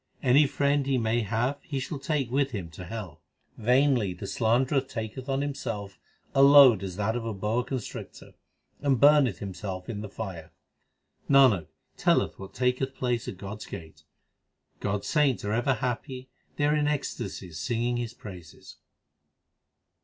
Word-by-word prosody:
Any 140 +3 +5
friend 140 0 +1
he 135 -1 +2
may 115 0 +1
have 115 +7 -1
he 140 -3 -4
shall 135 +3 -5
take 135 -4 -1
with 135 +1 +2
him 90 -6 -5
to 90 +3 -9
hell. 90 -6 -7 0.3
Vainly 125 -4 +2
the 90 - -7
slanderer 125 +7 +2
taketh 125 +1 -6
on 135 0 0
himself 115 -9 -4 0.3
a 135 - +4
load 140 -6 +8
as 95 -2 -5
that 105 +3 -1
of 120 - -2
a 115 -2 -4
boa 105 +5 0
constrictor, 130 -4 -7 0.5
1 140 -1 +2
and 125 - 0
burneth 145 -7 +5
himself 95 -1 -6
in 105 -3 -4
the 105 - -6
fire. 90 -6 -7 0.8
Nanak 130 - +5 0.3
telleth - - +1
what 95 0 -10
taketh 130 +1 0
place 120 -2 -1
at 95 - -6
God 100 +2 -7
s - - -9
gate. 80 -5 -9 0.8
God 100 0 -1
s - - -8
saints 145 -8 +2
are 105 - -1
ever 120 +3 +2
happy; 125 +2 -4 0.3
they 145 - +1
are 150 +1 +3
in 150 -1 +1
ecstasies 95 - -4
singing 120 +6 -1
His 120 -1 -4
praises. 90 -9 -11
120 Hz, 165 wpm, -27 LUFS, 100-135 Hz, 0.8 s, load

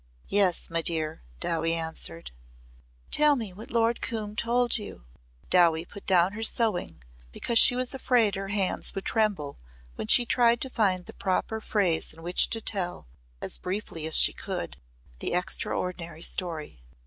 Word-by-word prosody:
"Yes, 195 -4 +2
my 165 0 -1
dear," 160 -2 -1 0.2
Dowie 165 - 0
answered. 160 - -3 0.8
"Tell 300 -1 +5
me 220 -7 -5
what 210 +5 -11
Lord 230 0 +1
Coombe 215 -2 -4
told 240 +1 +1
you." - - -10 0.5
Dowie 170 -2 +4
put 200 +2 -13
down 180 -1 +4
her 220 - -6
sewing 180 - 0 0.3
because 230 - +1
she 245 - +6
was 255 +1 -1
afraid 245 -5 +2
her 195 0 -4
hands 195 -1 -1
would 195 - -5
tremble 205 -11 -1 0.3
when 105 - -6
she 240 - +6
tried 235 0 +3
to 265 - -2
find 190 -6 0
the - - -11
proper 210 +3 -2
phrase 185 -9 0
in 165 +1 -14
which 175 +1 +3
to 225 - -3
tell 185 -5 -2 0.4
as - - +1
briefly 180 -4 -4
as 160 - +5
she - - +6
could - - -6 0.4
the - - -2
extraordinary 175 -2 -2
story. 160 - -2
190 Hz, 160 wpm, -27 LUFS, 165-225 Hz, 0.8 s, she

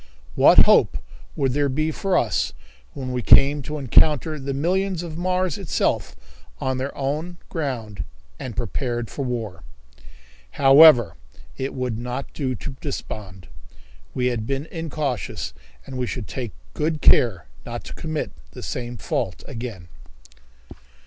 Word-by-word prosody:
What - - +7
hope - - +5 0.4
would 135 -3 +1
there 145 0 +1
be 155 +4 0
for 185 +3 0
us 110 - +1 0.4
when 130 -2 -5
we 125 -1 -1
came 140 +5 +6
to 150 +3 -5
encounter 150 +3 +3
the 140 0 -4
millions 180 +5 0
of 165 -2 -6
Mars 185 0 0
itself 190 -7 -1 0.4
on 130 0 -1
their 135 +2 -4
own 150 +6 -2
ground 115 - -3 0.4
and 120 -5 -6
prepared 120 0 -2
for 140 - -3
war? 115 -9 -4 1.0
However, 135 - +7 0.4
it 135 +1 -4
would 125 -4 -2
not 125 +3 -5
do 130 -4 -2
to 135 +4 -7
despond. 100 - -6 0.7
We 125 - 0
had 120 -3 -1
been 135 +2 -2
incautious, 140 - -3 0.3
and 130 -1 -6
we 125 - -1
should 115 -4 -5
take 120 -5 -5 0.2
good 155 0 -1
care 95 -10 +5 0.2
not - - -6
to - - -8
commit 155 -2 -3 0.2
the - - -9
same 120 -1 -4
fault 95 -2 -3
again. 115 -8 -6
135 Hz, 140 wpm, -23 LUFS, 120-150 Hz, 1.0 s, What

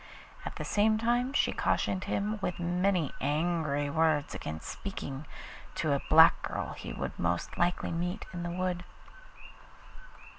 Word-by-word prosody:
At - - -6
the - - -4
same 215 +1 +3
time 240 +3 +1
she 285 - +2
cautioned 185 0 0
him 210 +2 -1
with 180 - -2
many 175 -2 +1
angry 150 0 +1
words 160 -2 +2
against 80 0 -6
speaking 145 -7 -6 0.5
to 155 -3 +1
a 140 - 0
black 160 +1 +8
girl - - -3
he - - -7
would - - -5
most 85 0 -1
likely 175 +1 +1
meet 175 +4 -2
in 175 - -4
the 175 - -3
wood. 180 0 -2
175 Hz, 145 wpm, -30 LUFS, 150-195 Hz, 0.5 s, black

